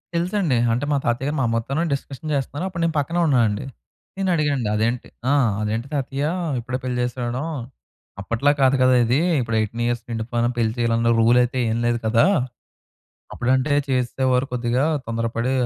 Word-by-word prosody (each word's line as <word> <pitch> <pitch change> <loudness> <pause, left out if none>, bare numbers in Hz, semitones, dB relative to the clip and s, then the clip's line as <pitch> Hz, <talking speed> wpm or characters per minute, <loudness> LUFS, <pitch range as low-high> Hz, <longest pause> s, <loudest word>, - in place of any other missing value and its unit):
తెలుసండి. 175 -4 +1 0.2
అంటే, 125 +5 -1
మా 145 - +3
తాతయ్య 120 +4 0
గారు 150 - -1
మా - - +2
అమ్మతోనే 115 +8 -1
డిస్కషన్ 140 +2 -5
చేస్తున్నారు. 145 +5 -3
అప్పుడు 170 -2 -5
నేను 165 -2 0
పక్కనే 165 +5 -1
ఉన్నానండి. 115 -4 +2 0.5
నేను 195 -1 0
అడిగానండి 145 -8 0
అదేంటి 115 +3 -1 0.2
ఆ! - - +4 0.3
అదేంటి 110 +4 -2
తాతయ్య, 140 0 -2 0.4
ఇప్పుడే 125 +2 -3
పెళ్లి 125 -1 -2
చేసేడం 125 +3 -3 0.8
అప్పట్లా 115 +8 +1
కాదు 135 0 +5
కదా! 130 0 +5
ఇది 120 +4 +2 0.2
ఇప్పుడు 115 -2 -2
18 115 +2 -2
ఇయర్స్ 120 0 -1
నిండిపోయిన 115 +1 -1
పెళ్లి 115 -2 +1
చేయాలన్న 115 0 +2
రూల్ 115 +2 +5
అయితే 125 +1 -3
ఏమి 115 +1 -1
లేదు 120 0 +1
కదా! 115 +1 +4 1.1
అప్పుడంటే 130 +4 +1 0.2
చేసేసేవారు 130 0 +1
కొద్దిగా 120 +1 0 0.2
తొందరపడి 115 +2 -1
125 Hz, 155 wpm, -22 LUFS, 115-140 Hz, 1.1 s, కాదు